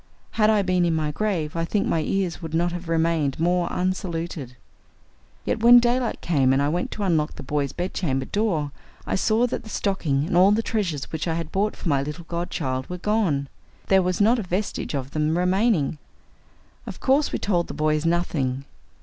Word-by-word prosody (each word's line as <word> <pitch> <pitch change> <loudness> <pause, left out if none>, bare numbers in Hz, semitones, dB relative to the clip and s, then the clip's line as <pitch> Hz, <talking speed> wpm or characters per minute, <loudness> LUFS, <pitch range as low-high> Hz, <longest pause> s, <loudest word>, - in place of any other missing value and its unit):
Had 215 -1 +3
I 210 -2 +3
been 185 -1 +1
in 170 -2 +2
my 155 -1 -1
grave 170 -4 -2
I 165 - 0
think 200 +4 0
my 160 - +1
ears 185 +1 -1
would 160 -1 -5
not 175 +1 +1
have 175 -1 -6
remained 160 -4 +1
more 175 +1 +2
unsaluted. 170 - -3 0.9
Yet - - -1
when 240 +1 +9
daylight 240 0 +1
came 135 -6 +2
and 135 - +2
I 140 +1 +1
went 175 +3 -1
to 210 - -4
unlock 160 -5 +1
the - - -8
boys' 140 0 -1
bedchamber 170 -7 -2
door, 170 -9 -1 0.3
I - - -3
saw 220 +4 +2
that 245 - -3
the 220 - -11
stocking 160 -10 0
and 175 - -2
all 185 +3 +6
the 225 +2 +1
treasures 175 - -1
which 160 +1 -3
I 165 - 0
had 165 -1 -4
bought 205 +2 0
for - - -7
my 140 -3 +2
little 150 +4 -6
godchild 150 -6 -3
were 180 - -4
gone. 180 -8 0 0.4
There 190 -1 +5
was 180 0 -1
not 225 +4 +4
a - - -1
vestige 185 -4 -3
of 135 0 -4
them 155 +2 0
remaining! 180 - +1 0.9
Of - - -7
course 280 +3 +2
we - - -1
told 175 -4 0
the - - -7
boys 155 0 +1
nothing. 145 -6 -1
170 Hz, 200 wpm, -24 LUFS, 150-195 Hz, 0.9 s, when